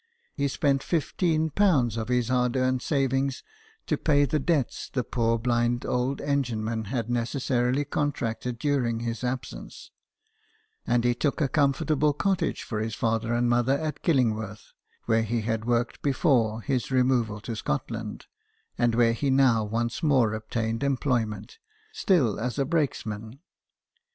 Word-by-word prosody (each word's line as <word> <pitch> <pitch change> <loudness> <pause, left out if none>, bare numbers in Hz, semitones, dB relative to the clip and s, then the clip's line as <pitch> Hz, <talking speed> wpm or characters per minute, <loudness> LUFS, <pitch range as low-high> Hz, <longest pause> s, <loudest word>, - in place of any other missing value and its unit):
He 140 0 0
spent 140 0 +1
^15 160 - +1
of 110 -1 -3
his 125 -1 +1
hard 125 0 +1
earned 130 0 +1
savings 135 -2 0 0.4
to - - -1
pay 145 -2 +3
the 150 +3 0
debts 145 -4 -1
the 125 - -1
poor 115 -1 0
blind 120 +1 0
old 125 +2 -1
engine 135 -6 -1
man 110 0 -2
had 115 +1 -2
necessarily 125 +2 0
con 145 0 0
tracted 120 -1 -4
during 120 -4 0
his 115 +1 -4
absence, 125 0 -5 1.0
and 120 -1 +2
he 120 0 +3
took 140 +6 -1
a 150 - +2
com 140 0 +3
fortable 150 -1 +1
cottage 190 -3 0
for 110 - -4
his 110 0 -3
father 115 0 0
and 120 0 +2
mother 120 +3 +2
at 155 0 -4
Killingworth, 110 - 0 0.3
where 115 -1 +3
he 115 +1 -1
had 110 0 -2
worked 120 0 0
before 125 -6 +2
his 130 -4 -1
removal 125 -5 +1
to 115 +2 -5
Scotland, 70 -9 -4 0.5
and 120 -1 +2
where 115 -1 +4
he 140 +4 -1
now 130 -4 +4
once 115 +5 -2
more 130 -9 +3
obtained 110 +1 -3
employment, 130 - -1 0.3
still 165 - +2
as 125 +3 -3
a 140 - +1
brakes 155 -1 0
man. 110 +3 -6
125 Hz, 150 wpm, -26 LUFS, 115-140 Hz, 1.0 s, where